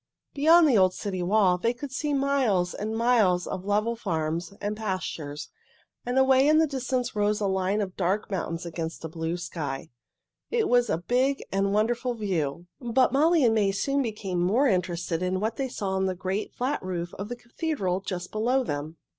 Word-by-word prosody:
Beyond 320 +3 +6
the 245 -8 +4
old 185 -1 +3
city 190 -3 -3
wall 185 -1 +3
they 235 +5 0
could 280 +1 -7
see 295 +3 -2
miles 270 -10 +1
and 220 +2 -3
miles 220 -7 +3
of 185 - -5
level 210 +3 +1
farms 165 -5 -2
and 205 +1 -2
pastures, 185 -8 -4 0.6
and 250 +1 0
away 265 +1 +5
in 310 +1 +5
the 320 - +5
distance 255 -4 -2
rose 210 0 +1
a 210 - -1
line 190 +2 0
of 185 -2 -4
dark 195 +4 -1
mountains 165 -2 -3
against 165 -1 -5
a - - -4
blue 165 +1 -3
sky. 155 -4 -5 0.6
It 465 -2 +1
was 245 -2 +3
a - - +1
big 255 +10 0
and 195 0 +1
wonderful 235 +4 0
view, 175 -7 -2
but 245 0 +2
Molly 310 +1 +4
and 225 - +4
May 205 -3 +2
soon 275 +8 0
became 205 -7 -3
more 215 +11 +3
interested 175 -4 -1
in 185 +1 0
what 220 +3 -2
they 270 -1 -2
saw 200 -5 -3
on 190 0 0
the 185 - -2
great, 190 +3 -3
flat 265 +4 -1
roof 175 -2 -4
of 200 +2 -5
the 245 - -4
cathedral 240 - -2
just 180 -2 -5
below 245 +5 +1
them. 150 -3 -4
205 Hz, 190 wpm, -26 LUFS, 180-245 Hz, 0.6 s, Beyond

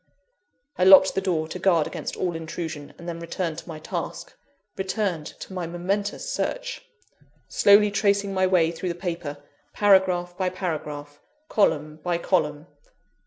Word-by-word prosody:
I - - +4
locked 190 0 +8
the 195 - 0
door 160 -5 0
to 180 - -6
guard 170 -4 +3
against - - -5
all 180 -2 -1
intrusion, 160 -2 -6
and 170 - -11
then 170 -1 -4
returned 170 -1 -3
to - - -14
my 160 - -6
task 155 - -5 0.4
returned 190 -5 -2
to 190 - -10
my 180 -3 -3
momentous 195 - -2
search - - -3 0.7
slowly 205 +1 +5
tracing 200 -1 +1
my 185 0 +2
way 170 -3 +3
through 175 +2 -4
the 170 - -3
paper, 170 -5 -4 0.4
paragraph 185 -3 +3
by 185 -1 0
paragraph, 150 -5 -5 0.3
column 155 -7 +1
by 175 +1 0
column. 155 -4 0
175 Hz, 150 wpm, -25 LUFS, 160-190 Hz, 0.7 s, locked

